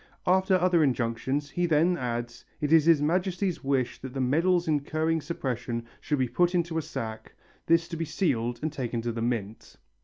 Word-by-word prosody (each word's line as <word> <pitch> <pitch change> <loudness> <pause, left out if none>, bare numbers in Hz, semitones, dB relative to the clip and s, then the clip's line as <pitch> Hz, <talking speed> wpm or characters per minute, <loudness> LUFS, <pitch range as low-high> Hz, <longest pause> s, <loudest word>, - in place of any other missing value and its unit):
After 190 +1 +3
other 180 -2 +3
injunctions, 130 +2 -1
he 175 +3 0
then 165 +3 +3
adds: 120 -4 -4 0.2
"It 150 +1 +1
is 160 -2 +6
His 165 -3 +5
Majesty's 180 +3 0
wish 135 -2 -1
that 130 0 -8
the - - -2
medals 170 +7 +2
incurring 155 +2 0
suppression 120 -6 -3
should 150 - -1
be 130 -1 +1
put 175 +7 +1
into 170 -2 0
a - - -1
sack, 110 -6 -6 0.3
this 165 0 +3
to 170 - -5
be 165 - -2
sealed 130 -8 -1
and 155 -1 -1
taken 120 -4 -3
to 120 - -1
the 115 0 -4
mint...." 115 -3 -3
150 Hz, 185 wpm, -27 LUFS, 120-170 Hz, 0.3 s, is